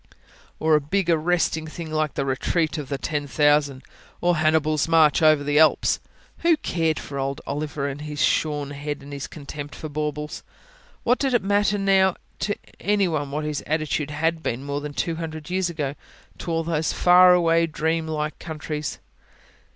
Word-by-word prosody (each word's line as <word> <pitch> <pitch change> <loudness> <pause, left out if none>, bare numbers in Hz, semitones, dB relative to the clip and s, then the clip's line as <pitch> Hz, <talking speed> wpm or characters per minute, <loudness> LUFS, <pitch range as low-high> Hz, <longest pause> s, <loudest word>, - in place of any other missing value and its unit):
Or 160 0 +2
a 150 - +5
big, 175 +4 0
arresting 160 -1 +1
thing 160 0 -7
like 155 -1 -1
the 140 - -1
Retreat 155 +5 0
of 145 - -7
the 140 - -2
Ten 145 +1 -3
Thousand, 145 0 +2 0.4
or 175 -1 +2
Hannibal's 155 -1 +2
March 160 -2 +4
over 155 -2 +5
the 145 +1 +2
Alps? 160 -1 +4 0.4
Who 335 -2 +3
cared 165 - 0
for 140 -1 -6
old 135 +1 -2
Oliver, 145 0 -3
and 140 +1 -5
his 150 -1 -6
shorn 145 -2 +1
head, 145 +1 -5
and 145 +1 -9
his 140 -1 -5
contempt 145 -1 -8
for 155 - -7
baubles! 150 0 -4 0.6
What 245 +2 +2
did 270 -3 +1
it 235 - +2
matter 205 +1 +2
now 195 -2 +3 0.2
to 205 - -1 0.2
anyone 180 -8 0
what 150 +2 -3
his 150 -1 -2
attitude 155 -1 -1
had 160 +2 -1
been, 125 -3 -3
more 140 0 -3
than 150 0 -6
two 165 -1 -1
hundred 160 0 -6
years 185 -1 0
ago, 145 -5 -3 0.5
to - - -6
all 165 0 0
those 160 -1 -1
far 180 0 +7
away, 165 -1 +3
dream 160 +1 -1
like 155 -1 -3
countries? 155 -2 -5
155 Hz, 175 wpm, -24 LUFS, 145-165 Hz, 0.6 s, far